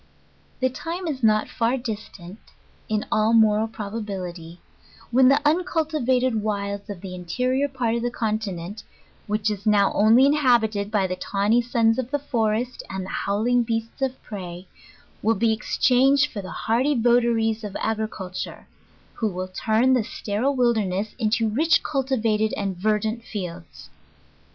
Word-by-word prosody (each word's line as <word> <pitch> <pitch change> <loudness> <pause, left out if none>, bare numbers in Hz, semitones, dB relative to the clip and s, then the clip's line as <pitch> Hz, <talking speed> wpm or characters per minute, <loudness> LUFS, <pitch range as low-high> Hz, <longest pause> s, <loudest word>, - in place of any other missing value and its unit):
The 260 - +3
time 340 +7 -5
is 285 -5 -3
not 215 -2 +3
far 235 +2 0
distant, 210 -5 -7 0.5
in 215 -1 0
all 215 +1 +2
moral 220 -1 +4
probability, 195 -6 -6 0.5
when 255 +2 +5
the 275 +2 +5
uncultivated 295 -8 +1
wilds 200 -1 -3
of 195 -4 -6
the 190 -2 -7
interior 250 +10 -1
part 250 -4 -1
of 235 - -1
the 245 - 0
continent, 210 -4 -3 0.5
which 210 +1 0
is 205 0 -5
now 205 -2 +4
only 225 +5 +5
inhabited 240 -8 +2
by 210 -3 +1
the 185 0 -2
tawny 200 +5 +1
sons 230 -1 +2
of 250 -1 -3
the 290 - 0
forest, 240 -3 -1
and 190 -1 -4
the - - -8
howling 235 +5 +1
beasis 225 +2 -4
of 265 -1 -2
prey, 180 -4 -7 0.6
will 225 +2 +2
be 225 -1 +2
exchanged 265 +5 +3
for 205 - -5
the 185 - -8
hardy 250 +9 0
votaries 230 -2 +2
of 205 -2 -5
agriculture, 215 -4 -4 0.5
who 225 - -1
will 185 -2 -4
turn 225 +6 +2
the 255 - +4
steril 220 +6 -2
wilderness 215 -5 0
into 225 0 +1
rich 305 +10 +2
cultivated 230 -6 0
and 195 -2 -2
verdant 215 +4 -1
fields. 180 -7 -8
220 Hz, 145 wpm, -24 LUFS, 205-250 Hz, 0.6 s, when